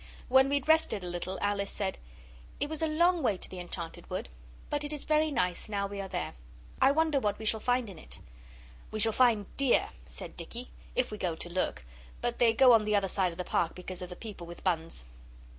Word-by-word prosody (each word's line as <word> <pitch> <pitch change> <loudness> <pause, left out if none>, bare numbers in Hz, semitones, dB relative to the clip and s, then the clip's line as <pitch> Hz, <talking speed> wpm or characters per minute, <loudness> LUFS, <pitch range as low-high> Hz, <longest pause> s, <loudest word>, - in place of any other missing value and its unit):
When 265 +1 +6
we'd 280 -1 0
rested 315 -11 +3
a - - -4
little, 175 +2 -3
Alice 200 -1 0
said 195 -2 -3 0.6
'It - - 0
was 315 +1 -5
a 320 - +2
long 340 +3 +3
way 205 -9 +2
to - - -5
the 185 - -8
enchanted 175 -1 -7
wood, - - -3 0.4
but 290 0 +1
it 290 - -4
is 300 -2 -3
very 310 0 +3
nice 215 -9 -1
now 200 -1 0
we 200 0 -4
are 195 - -5
there. - - -3 0.5
I 270 - +7
wonder 310 -1 +3
what 210 -5 0
we 220 - -7
shall 220 +1 +2
find 245 +1 +1
in 185 -5 -9
it?' - - -10 0.7
'We 215 - -4
shall 225 +1 +3
find 220 -4 +3
deer,' 275 -3 +3 0.2
said - - -9
Dicky, 245 +2 -7 0.2
'if 255 -2 +1
we 210 - -6
go 175 -3 -1
to 175 - -6
look; 170 - -1 0.3
but 240 -1 -2
they 235 -2 +6
go 250 +2 +7
on 225 -2 +6
the 210 0 +2
other 200 -1 +2
side 185 -1 +1
of 165 - -11
the 180 - -2
Park 170 -1 0
because 185 0 -7
of 180 - -5
the 180 - -7
people 205 -6 -8
with 175 - -10
buns. 165 - -1
210 Hz, 230 wpm, -31 LUFS, 185-265 Hz, 0.7 s, I